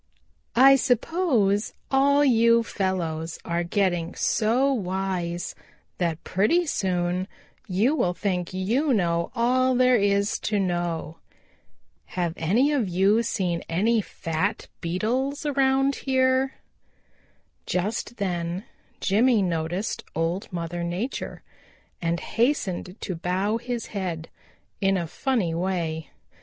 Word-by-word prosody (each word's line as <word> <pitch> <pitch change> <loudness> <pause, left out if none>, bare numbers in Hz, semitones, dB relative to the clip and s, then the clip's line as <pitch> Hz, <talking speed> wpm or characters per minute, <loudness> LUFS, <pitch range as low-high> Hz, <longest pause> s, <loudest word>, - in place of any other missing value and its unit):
I 270 +3 +8
suppose 245 - +1 0.2
all 280 +2 +4
you 230 -2 +5
fellows 170 -6 -2
are 170 0 -1
getting 175 -2 0
so 250 +6 +2
wise 185 -4 -2 0.5
that 170 -2 -1
pretty 275 - +2
soon 180 - -1 0.4
you 205 +9 +2
will 180 - +1
think 180 -4 -2
you 235 +10 +1
know 170 -3 +1
all 255 +2 +2
there 250 0 +5
is 200 0 +1
to 210 - -1
know. 175 -3 -2 1.0
Have 175 -2 0
any 230 - +2
of 255 -10 +1
you 195 +5 +3
seen 185 -7 -1
any 215 +7 +2
fat 165 -2 -3
Beetles 250 - -1
around 270 -1 +2
here?" 260 0 +1 1.1
Just 210 +6 -2
then 175 -1 -2 0.4
Jimmy 220 +2 +3
noticed 175 +3 -2
Old 165 +4 -2
Mother 170 0 -4
Nature 180 +10 -4 0.6
and 170 0 0
hastened 200 -8 -1
to 190 - -3
bow 185 +5 0
his 240 0 -4
head 175 -5 -3 0.5
in 195 0 +3
a 175 - -1
funny 190 - -1
way. 165 -3 -2
195 Hz, 110 wpm, -25 LUFS, 175-245 Hz, 1.1 s, I